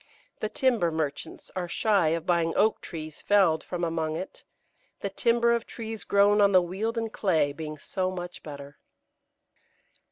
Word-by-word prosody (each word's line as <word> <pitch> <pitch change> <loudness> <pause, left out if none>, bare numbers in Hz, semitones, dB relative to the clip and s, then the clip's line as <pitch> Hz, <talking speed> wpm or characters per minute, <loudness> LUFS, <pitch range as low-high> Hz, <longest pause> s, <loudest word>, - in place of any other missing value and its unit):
The 215 - -2
timber 235 -10 +2
merchants 155 -3 -4
are 180 -1 -2
shy 200 -1 +2
of 165 +1 0
buying 170 -2 +2
oak 215 +2 +2
trees 155 -3 -7
felled 190 -6 +3
from 175 -1 -4
among 160 -2 -1
it, 185 - -7 0.6
the - - -3
timber 235 0 +2
of 235 -1 -1
trees 225 -2 -7
grown 205 +1 +4
on 200 -1 +5
the 185 - +8
wealden 220 +6 -2
clay 160 -10 +1
being 155 0 -6
so 185 +5 -2
much 180 -1 -6
better. 140 -1 -10
180 Hz, 155 wpm, -27 LUFS, 160-210 Hz, 0.6 s, the